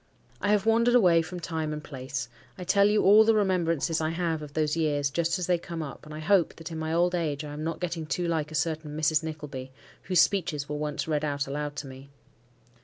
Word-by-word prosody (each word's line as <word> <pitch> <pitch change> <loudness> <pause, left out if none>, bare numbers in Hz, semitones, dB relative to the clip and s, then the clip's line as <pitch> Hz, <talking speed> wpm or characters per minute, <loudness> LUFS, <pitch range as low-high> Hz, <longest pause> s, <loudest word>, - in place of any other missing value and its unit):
I 205 - 0
have 210 -1 +3
wandered 235 +2 +4
away 175 -8 +5
from 175 +2 -6
time 160 -2 -3
and 150 0 -5
place. 130 -3 -5 0.3
I - - -6
tell 200 +2 +4
you 210 0 +2
all 210 +3 +8
the 225 0 +3
remembrances 170 -5 +1
I 155 - 0
have 165 -1 -1
of 150 -1 -9
those 155 0 0
years 145 -3 0
just 170 +4 0
as 180 - -2
they 175 -1 +2
come 170 -1 -5
up, 145 +1 -9
and 155 - -8
I - - -6
hope 175 +2 +2
that, 165 0 -9
in 160 - -5
my 160 0 -3
old 175 +2 +2
age, 155 -4 -1
I 145 - -7
am 150 +1 -5
not 165 +1 -3
getting 170 -3 -3
too 170 +5 -1
like 160 -2 -1
a - - -6
certain 155 0 -2
Mrs. 155 0 +2
Nickleby, 150 -5 -6 0.3
whose 185 -2 +1
speeches 160 -7 +1
were 150 - -4
once 150 +1 -3
read 150 -1 0
out 145 -2 -1
aloud 145 +1 -4
to 145 - -5
me. 135 +1 -11
160 Hz, 240 wpm, -27 LUFS, 150-175 Hz, 0.3 s, all